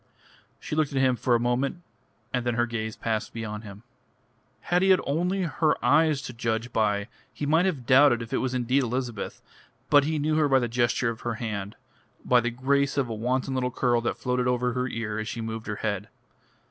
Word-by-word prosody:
She - - -5
looked 155 -2 +1
at 140 - -3
him 130 -1 +3
for 120 0 +1
a - - +2
moment, 130 +8 -1 0.5
and 125 - 0
then 120 -1 -1
her 120 0 +2
gaze 110 -2 -4
passed 110 -2 -3
beyond 110 -1 -5
him. 100 0 -11 0.8
Had 175 +1 +1
he 190 - +3
had 185 -1 +6
only 180 +6 0
her 160 -2 +1
eyes 155 -2 +3
to 125 - -6
judge 115 0 -2
by 105 -2 +1 0.2
he 145 - -5
might 160 +5 +3
have 140 -10 -3
doubted 130 -2 +5
if 115 +3 -9
it - - +2
was 130 -1 -2
indeed 125 +2 +2
Elizabeth, 125 -3 -4 0.5
but 145 -1 +7
he 155 +1 0
knew 155 +1 +1
her 150 -2 +3
by 135 - +5
the 120 -2 +1
gesture 120 0 +1
of 115 - -9
her 120 -1 -2
hand, 105 -4 -4 0.5
by 125 - +5
the 120 - -1
grace 140 +3 0
of 135 -4 +1
a - - -3
wanton 125 +4 -1
little 125 -1 0
curl 120 -1 +1
that 120 - -2
floated 125 -1 -1
over 125 0 +1
her 125 +1 -1
ear 110 -3 -3
as 110 - -4
she 115 - -5
moved 110 0 -5
her 105 - -2
head. 100 -1 -2
125 Hz, 215 wpm, -26 LUFS, 115-140 Hz, 0.8 s, but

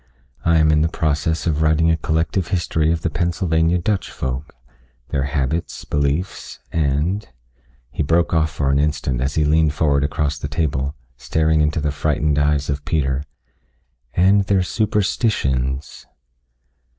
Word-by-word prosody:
I 85 0 +3
am 80 -1 +4
in 75 0 +3
the 80 - +2
process 80 0 -1
of 80 -3 0
writing 80 +1 +3
a - - +3
collective 80 +2 -1
history 80 -2 0
of 85 -1 -2
the 85 - 0
Pennsylvania 85 0 +1
Dutch 95 +3 -1
folk, 65 +3 -5 0.5
their 70 -1 0
habits, 70 +4 -2
beliefs, 75 +6 -2
and 80 +7 0 0.3
" - - -36
he - - -3
broke 85 +4 +2
off 80 -1 +2
for 70 -3 -1
an 70 - +2
instant 70 -4 0
as 70 +2 -1
he 75 - +2
leaned 75 0 +2
forward 70 -2 +2
across 75 0 -1
the 70 - -4
table, 70 -1 -1 0.2
staring 80 +4 +1
into 75 +1 +1
the 75 0 -1
frightened 75 0 0
eyes 75 0 +1
of 70 0 -2
Peter 70 -5 0 0.5
" - - -45
and 100 +1 +4
their 95 -1 +2
superstitions." 90 - -1
75 Hz, 155 wpm, -20 LUFS, 70-80 Hz, 0.5 s, am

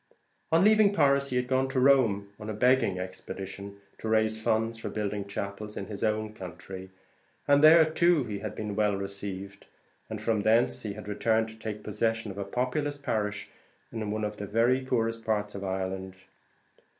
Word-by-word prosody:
On 165 +3 +5
leaving 215 -1 +5
Paris 140 -3 +3
he 125 - -3
had 125 0 +1
gone 130 +1 +1
to 135 -1 0
Rome 120 -7 +4
on 105 0 -6
a 110 - -3
begging 120 -4 +3
expedition, 95 +2 -7 0.2
to - - -5
raise 110 0 +2
funds 115 +1 0
for - - -4
building 105 -1 -3
chapels 100 +1 -5
in - - -4
his 100 -2 -6
own 110 0 0
country, 95 -1 -9 0.6
and 145 +1 +5
there 160 +1 +9
too 165 -1 +3
he 105 -4 -5
had 110 +1 -5
been 105 -2 -4
well 105 -1 +2
received; 100 0 -6 0.4
and - - -4
from 110 -2 0
thence 110 +3 +3
he 105 -2 -4
had 105 0 -9
returned 110 +2 +1
to 110 - -12
take 110 -1 -6
possession 115 +1 -1
of 100 - -8
a - - -1
populous 130 +8 -2
parish 105 -7 -2 0.4
in 110 -2 -4
one 110 +1 -2
of 105 0 -3
the 105 - -5
very 120 +5 +2
poorest 115 -3 -1
parts 105 -1 -1
of 100 - -6
Ireland. 95 0 -3
110 Hz, 185 wpm, -28 LUFS, 100-125 Hz, 0.6 s, there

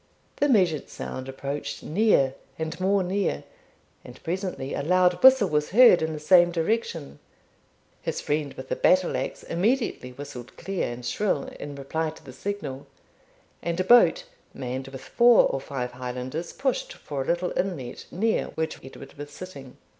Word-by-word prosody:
The 290 - +2
measured 180 - +2
sound 130 0 -6
approached 140 +1 -5
near 155 -7 +3 0.2
and 160 +1 -4
more 195 +1 +2
near, 195 +2 -1 0.6
and - - -13
presently 180 -5 -3
a - - -2
loud 180 +3 +3
whistle 260 -7 +7
was 150 0 0
heard 230 -5 +7
in 160 0 -1
the 155 - -5
same 175 +3 +6
direction. 170 - -2 0.8
His - - -3
friend 145 -1 -1
with 130 - -9
the - - 0
battle 185 -1 +3
axe - - -4
immediately 205 - 0
whistled 125 -2 -9
clear 195 -9 -2
and 120 0 -8
shrill, 185 - 0 0.2
in 145 -1 -6
reply 155 +4 -2
to 155 - -13
the 130 - -10
signal, 145 -8 -5 0.7
and 170 +1 -2
a - - +2
boat, 245 - +6 0.3
manned 130 +1 -4
with 135 -1 -9
four 240 -1 +5
or 135 - -1
five 125 -3 -4
Highlanders, 125 +6 -5
pushed - - -2
for 145 - -5
a 135 - -5
little 175 +1 0
inlet, 160 -11 -3
near 220 +5 0
which 160 0 -3
Edward 135 +1 -11
was 145 0 -6
sitting. 145 -5 -10
160 Hz, 160 wpm, -26 LUFS, 135-190 Hz, 0.8 s, whistle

